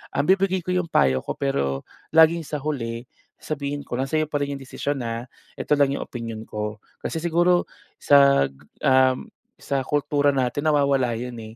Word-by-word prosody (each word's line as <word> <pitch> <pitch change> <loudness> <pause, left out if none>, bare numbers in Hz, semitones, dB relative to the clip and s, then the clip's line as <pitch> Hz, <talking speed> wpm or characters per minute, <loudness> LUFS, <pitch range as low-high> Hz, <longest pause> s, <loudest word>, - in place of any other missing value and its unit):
Um, 140 - +1
bibigay 190 0 +3
ko 185 - -2
yung 180 -2 0
payo 65 -1 +3
ko, - - -3
pero 70 - -1 0.3
laging 160 +1 +6
sa - - -4
huli 120 -5 -3 0.4
sabihin 145 -1 -4
ko 130 - -5
na, 130 - 0
"Sa'yo 155 +1 +1
pa 150 - -1
rin 140 0 -3
yung 135 - -9
desisyon, 140 +1 -3
ha. 115 +1 -4 0.3
Ito - - 0
lang 140 -1 +4
yung - - -3
opinyon 115 -2 -6
ko." 105 0 -4 0.3
Kasi - - -3
siguro 175 +1 +3 0.4
sa 140 - +6
ga, 70 - -21 0.5
um, 130 - -8 0.4
sa 140 -1 -1
kultura 145 0 +1
natin 130 +3 -1
nawawala 140 -5 +2
yun 125 +1 -5
eh. 110 0 -10
140 Hz, 180 wpm, -23 LUFS, 115-155 Hz, 0.5 s, laging